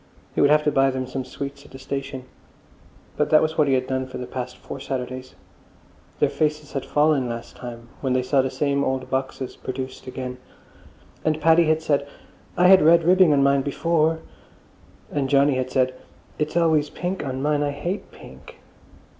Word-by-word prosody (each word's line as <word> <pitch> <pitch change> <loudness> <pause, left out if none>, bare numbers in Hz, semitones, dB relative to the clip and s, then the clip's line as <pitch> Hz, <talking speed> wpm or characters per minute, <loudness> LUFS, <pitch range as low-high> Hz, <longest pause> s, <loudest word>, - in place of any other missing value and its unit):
He - - +1
would 140 - +5
have 150 0 +4
to 150 - +2
buy 135 -1 +3
them 130 -1 -3
some 130 +1 -4
sweets 140 +2 -7
at - - -16
the 135 - -11
station. 135 0 -5 0.9
But - - +1
that 155 - +7
was 155 0 -1
what 150 -2 +3
he 135 - +3
had 130 0 0
done 130 0 -2
for 130 - -7
the 125 - -5
past 125 0 -6
four 135 - -8
Saturdays; 130 -1 -5 0.8
their - - +3
faces 150 -1 -1
had 135 - -3
fallen 145 -4 +2
last 115 0 -7
time 120 -1 -9
when 130 -2 -1
they 130 0 +1
saw 135 +1 +3
the 130 - -1
same 140 +1 0
old 130 -1 -2
boxes 130 -1 -3
produced 130 0 -6
again. 125 -1 -6 0.8
And 155 -1 +1
Paddy 165 +2 +5
had 155 0 +1
said, 140 -2 +1 0.5
"I 180 - +4
had 190 +1 +8
red 165 +2 +6
ribbing 180 0 +5
on 140 -1 +4
mine 140 0 +3
bee 145 - -3
fore!" 160 +1 +1 0.9
And 140 -2 -1
Johnny 140 +1 +4
had 130 0 -1
said, 130 0 +1 0.5
"It's 150 +2 -1
always 160 -3 +3
pink 180 +2 -4
on 130 0 -4
mine. 150 0 +1
I 145 - +1
hate 170 +8 -4
pink." - - -14
140 Hz, 195 wpm, -23 LUFS, 130-155 Hz, 0.9 s, had